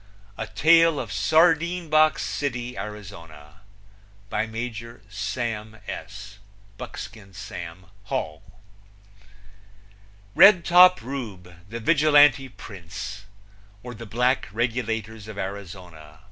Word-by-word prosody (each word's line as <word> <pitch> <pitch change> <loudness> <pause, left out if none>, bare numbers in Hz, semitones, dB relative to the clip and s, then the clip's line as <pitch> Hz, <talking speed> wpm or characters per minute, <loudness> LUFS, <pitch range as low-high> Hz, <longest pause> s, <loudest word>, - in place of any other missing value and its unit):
A - - -5
tale 165 -1 +4
of 105 -6 -5
Sardine 170 - +2
box 155 -1 +3
City, 125 -3 -4
Arizona. 85 -8 -10 0.7
By 110 - -1
Major 115 0 -7
Sam 110 +2 -4
S. 100 0 -8 0.4
(Buckskin 110 -5 -9
Sam) 90 -3 -8 0.2
Hall. 105 - -4 1.9
Redtop 180 - +7
Rube, 110 -9 -7 0.2
the 115 +2 -6
Vigilante 145 0 +4
Prince; 100 -1 -9 0.6
or, 125 0 -7
The 115 0 -10
Black 125 +4 0
Regulators 110 -2 -3
of 110 -1 -9
Arizona. 90 -6 -8
110 Hz, 90 wpm, -24 LUFS, 100-135 Hz, 1.9 s, Redtop